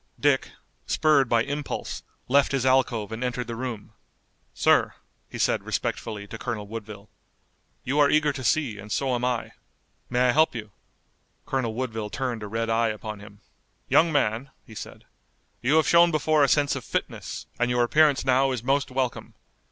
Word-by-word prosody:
Dick, 145 Hz, -2 st, +2 dB, 0.4 s
spurred 145 Hz, -5 st, +3 dB
by 115 Hz, -1 st, +3 dB
impulse, 145 Hz, +1 st, -4 dB, 0.3 s
left 140 Hz, +2 st, +3 dB
his 135 Hz, -2 st, 0 dB
alcove 125 Hz, -5 st, +2 dB
and 110 Hz, +3 st, -4 dB
entered 125 Hz, 0 st, -2 dB
the 115 Hz, 0 st, -5 dB
room. 120 Hz, -3 st, -6 dB, 0.6 s
"Sir," -, -, +2 dB, 0.3 s
he -, -, -7 dB
said -, -, +1 dB
respectfully 105 Hz, -3 st, -3 dB
to -, -, -9 dB
Colonel 115 Hz, -4 st, -4 dB
Woodville, 105 Hz, -1 st, -8 dB, 0.8 s
"you 140 Hz, +4 st, 0 dB
are 145 Hz, -1 st, +5 dB
eager 150 Hz, -1 st, +3 dB
to 130 Hz, -, -6 dB
see, 125 Hz, -6 st, 0 dB
and 105 Hz, +2 st, -10 dB
so 130 Hz, +6 st, 0 dB
am 120 Hz, 0 st, -1 dB
I. 125 Hz, -2 st, -1 dB, 0.6 s
May 125 Hz, +1 st, +2 dB
I -, -, +6 dB
help 155 Hz, +1 st, +3 dB
you?" 105 Hz, -2 st, -6 dB, 0.7 s
Colonel 120 Hz, -5 st, -2 dB
Woodville 115 Hz, -4 st, -3 dB
turned 125 Hz, -2 st, -3 dB
a 105 Hz, -, -5 dB
red 115 Hz, +2 st, -2 dB
eye 115 Hz, +1 st, +2 dB
upon 105 Hz, -1 st, -6 dB
him. 105 Hz, 0 st, -14 dB, 0.5 s
"Young 165 Hz, 0 st, +4 dB
man," 130 Hz, -2 st, 0 dB, 0.2 s
he 110 Hz, -, -13 dB
said, 110 Hz, -, -9 dB, 0.6 s
"you 130 Hz, +6 st, +2 dB
have 160 Hz, -, +4 dB
shown 170 Hz, 0 st, +6 dB
before 155 Hz, -1 st, +2 dB
a -, -, +5 dB
sense 145 Hz, +1 st, +2 dB
of -, -, -5 dB
fitness, -, -, -4 dB
and 120 Hz, 0 st, +1 dB
your 125 Hz, 0 st, +2 dB
appearance 145 Hz, +2 st, +3 dB
now 135 Hz, +1 st, +3 dB
is 125 Hz, -3 st, -3 dB
most 140 Hz, +2 st, +1 dB
welcome. 130 Hz, -2 st, -3 dB
125 Hz, 175 wpm, -25 LUFS, 115-140 Hz, 0.8 s, I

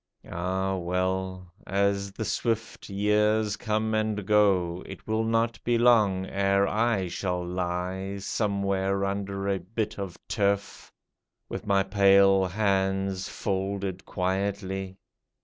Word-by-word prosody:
Ah, 95 Hz, +2 st, -1 dB
well! 90 Hz, 0 st, -2 dB
As 100 Hz, 0 st, +1 dB
the 110 Hz, -, -4 dB
swift 115 Hz, +2 st, -2 dB
years 105 Hz, +1 st, +2 dB
come 110 Hz, 0 st, -1 dB
and 110 Hz, -2 st, 0 dB
go, 95 Hz, -4 st, +3 dB
It -, -, -10 dB
will 110 Hz, +1 st, 0 dB
not 115 Hz, +1 st, 0 dB
be 120 Hz, 0 st, +2 dB
long 105 Hz, -6 st, +4 dB
ere 100 Hz, +1 st, +2 dB
I 110 Hz, -4 st, +1 dB
shall 90 Hz, 0 st, -2 dB
lie 90 Hz, +2 st, -3 dB
Somewhere 100 Hz, -1 st, 0 dB
under 100 Hz, 0 st, -3 dB
a 100 Hz, -1 st, +1 dB
bit 105 Hz, +4 st, -4 dB
of 95 Hz, -3 st, -5 dB
turf, 100 Hz, -1 st, -1 dB, 0.6 s
With -, -, -6 dB
my 100 Hz, -1 st, +3 dB
pale 95 Hz, 0 st, +5 dB
hands 95 Hz, -1 st, 0 dB
folded 95 Hz, -1 st, -3 dB
quietly. 95 Hz, 0 st, -2 dB
100 Hz, 115 wpm, -27 LUFS, 95-105 Hz, 0.6 s, pale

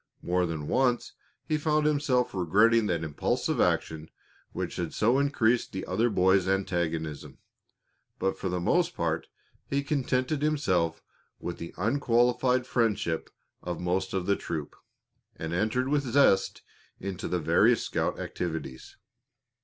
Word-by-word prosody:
More 90 Hz, 0 st, +1 dB
than 80 Hz, -3 st, -4 dB
once 125 Hz, -2 st, +1 dB, 0.3 s
he 155 Hz, -1 st, 0 dB
found 150 Hz, 0 st, +1 dB
himself 140 Hz, -4 st, +1 dB
regretting 105 Hz, +5 st, +3 dB
that 85 Hz, -3 st, -1 dB
impulsive 75 Hz, -3 st, -1 dB
action 80 Hz, 0 st, 0 dB, 0.4 s
which -, -, -4 dB
had -, -, -3 dB
so 120 Hz, +5 st, +3 dB
increased 125 Hz, -4 st, +1 dB
the 95 Hz, -, -4 dB
other 110 Hz, +6 st, +1 dB
boy's 95 Hz, -2 st, +3 dB
antagonism, 85 Hz, -5 st, -2 dB, 0.8 s
but 95 Hz, -, 0 dB
for 95 Hz, -, -4 dB
the 90 Hz, 0 st, -1 dB
most 90 Hz, -, +1 dB
part -, -, -1 dB, 0.4 s
he 140 Hz, 0 st, -1 dB
contented 140 Hz, 0 st, 0 dB
himself 95 Hz, -, 0 dB, 0.4 s
with 85 Hz, -, -5 dB
the 85 Hz, -, -8 dB
unqualified 125 Hz, -, +2 dB
friendship 105 Hz, -10 st, 0 dB, 0.3 s
of 90 Hz, -2 st, -4 dB
most 90 Hz, +2 st, -1 dB
of 95 Hz, -2 st, -1 dB
the 100 Hz, -, +2 dB
troop, 80 Hz, -6 st, -5 dB, 0.6 s
and 80 Hz, +1 st, -5 dB
entered 110 Hz, +8 st, 0 dB
with 145 Hz, +1 st, +2 dB
zest 125 Hz, -7 st, +2 dB, 0.4 s
into 95 Hz, -1 st, -5 dB
the 90 Hz, -, 0 dB
various 80 Hz, -, +3 dB
scout -, -, -2 dB
activities. 80 Hz, -7 st, -5 dB
100 Hz, 135 wpm, -28 LUFS, 85-125 Hz, 0.8 s, regretting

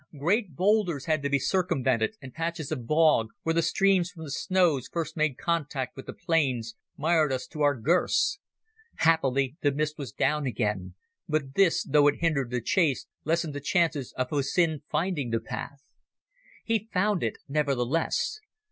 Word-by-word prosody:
Great 175 Hz, -, 0 dB
boulders 185 Hz, -6 st, +1 dB
had 155 Hz, -2 st, +1 dB
to 140 Hz, -, -1 dB
be 140 Hz, -, +3 dB
circumvented, 140 Hz, -, 0 dB
and 130 Hz, -, -9 dB
patches 165 Hz, -2 st, -3 dB
of 125 Hz, -7 st, -4 dB
bog, 155 Hz, -7 st, +4 dB, 0.2 s
where 165 Hz, -, +1 dB
the 165 Hz, -, +2 dB
streams 185 Hz, +2 st, +2 dB
from 165 Hz, -3 st, -11 dB
the 145 Hz, -, -7 dB
snows 160 Hz, -4 st, +1 dB
first 165 Hz, -2 st, -3 dB
made 155 Hz, -5 st, 0 dB
contact 150 Hz, -6 st, -2 dB
with 135 Hz, -, -10 dB
the -, -, -4 dB
plains, 130 Hz, -9 st, 0 dB, 0.2 s
mired 155 Hz, -1 st, +2 dB
us 130 Hz, -1 st, -2 dB
to 155 Hz, -, -8 dB
our 145 Hz, -1 st, +4 dB
girths. 180 Hz, -, +2 dB, 0.6 s
Happily 140 Hz, -4 st, +2 dB
the 145 Hz, -, +3 dB
mist 150 Hz, +2 st, -2 dB
was 140 Hz, -4 st, -5 dB
down 150 Hz, -2 st, 0 dB
again, 105 Hz, -5 st, -2 dB, 0.3 s
but 145 Hz, -3 st, -1 dB
this, 190 Hz, -1 st, +3 dB
though 145 Hz, 0 st, +4 dB
it 145 Hz, -, +3 dB
hindered 150 Hz, -7 st, 0 dB
the 125 Hz, 0 st, -2 dB
chase, 150 Hz, -, +1 dB, 0.2 s
lessened 165 Hz, 0 st, 0 dB
the 145 Hz, -, -5 dB
chances 155 Hz, -3 st, 0 dB
of 130 Hz, -1 st, -3 dB
Hussin 150 Hz, +2 st, +1 dB
finding 155 Hz, -4 st, -1 dB
the 115 Hz, 0 st, 0 dB
path. 140 Hz, +5 st, -7 dB, 0.8 s
He 225 Hz, -1 st, -1 dB
found 200 Hz, 0 st, +1 dB
it 115 Hz, -, -2 dB
nevertheless. 145 Hz, -, 0 dB
150 Hz, 165 wpm, -27 LUFS, 135-170 Hz, 0.8 s, bog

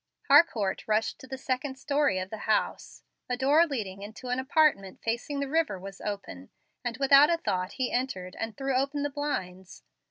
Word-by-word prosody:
Harcourt 245 Hz, -, +4 dB
rushed 215 Hz, +1 st, 0 dB
to 260 Hz, -, -12 dB
the 265 Hz, -, -6 dB
second 265 Hz, +1 st, -3 dB
story 280 Hz, -5 st, +1 dB
of 185 Hz, 0 st, -4 dB
the 220 Hz, 0 st, -7 dB
house. 215 Hz, -, -1 dB, 0.3 s
A 250 Hz, -, -1 dB
door 290 Hz, +6 st, +4 dB
leading 200 Hz, -9 st, -4 dB
into 220 Hz, +5 st, -8 dB
an 250 Hz, +1 st, 0 dB
apartment 260 Hz, -8 st, +2 dB
facing 240 Hz, +5 st, -2 dB
the 280 Hz, -, -1 dB
river 315 Hz, -7 st, 0 dB
was 195 Hz, +1 st, -9 dB
open, 195 Hz, -, -6 dB, 0.3 s
and 240 Hz, -1 st, -3 dB
without 275 Hz, +2 st, +6 dB
a 340 Hz, -, +2 dB
thought 185 Hz, -, -2 dB
he 255 Hz, -2 st, -2 dB
entered 190 Hz, -8 st, -3 dB
and 225 Hz, -2 st, -4 dB
threw 270 Hz, 0 st, -1 dB
open 280 Hz, +2 st, 0 dB
the 290 Hz, -, -2 dB
blinds. 190 Hz, -11 st, -5 dB
255 Hz, 185 wpm, -28 LUFS, 200-280 Hz, 0.3 s, without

